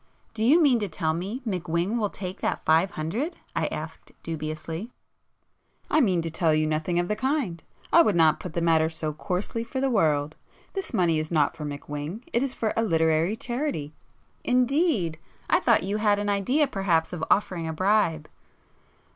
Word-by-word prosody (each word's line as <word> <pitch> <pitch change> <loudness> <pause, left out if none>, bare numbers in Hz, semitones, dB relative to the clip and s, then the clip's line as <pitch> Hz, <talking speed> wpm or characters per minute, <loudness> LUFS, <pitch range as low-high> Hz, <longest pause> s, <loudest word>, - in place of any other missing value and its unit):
"Do 220 -1 -2
you 285 +9 +6
mean 275 -7 +4
to 205 - -2
tell 160 -2 -1
me 195 +10 -4
McWhing 180 +3 -1
will 210 -2 0
take 185 -1 -7
that - - -2
five 160 +4 +4
hundred?" 215 - -2 0.2
I - - +1
asked - - -7
dubiously. 160 +5 -5 1.0
"I 310 - +4
mean 185 - +2
to 165 - -4
tell 160 -1 +2
you 155 0 +2
nothing 155 +3 -1
of 175 0 +1
the 210 - 0
kind. 255 - -1 0.3
I 335 - +9
would 215 - +2
not 160 -2 +4
put 180 - -7
the 170 - -1
matter 160 -1 +3
so 160 -1 -3
coarsely 185 +8 -3
for 235 +3 -4
the 270 0 +1
world! 155 -7 +1 0.4
This 390 -1 -4
money 170 -4 +2
is 155 0 -4
not 155 -4 +2
for 155 -2 -6
McWhing,—it 150 - -4
is 275 -1 0
for 220 -4 -2
a - - +2
literary 165 -1 +2
charity." 240 - -3 0.5
"Indeed! 250 - +1 0.3
I - - +5
thought - - +3
you 200 +3 -1
had 210 -1 +3
an 205 0 -1
idea 225 +10 +2
perhaps 190 -10 0
of 165 -2 -4
offering 180 -5 +1
a 160 - -3
bribe...." 180 -4 +1
180 Hz, 180 wpm, -26 LUFS, 160-225 Hz, 1.0 s, I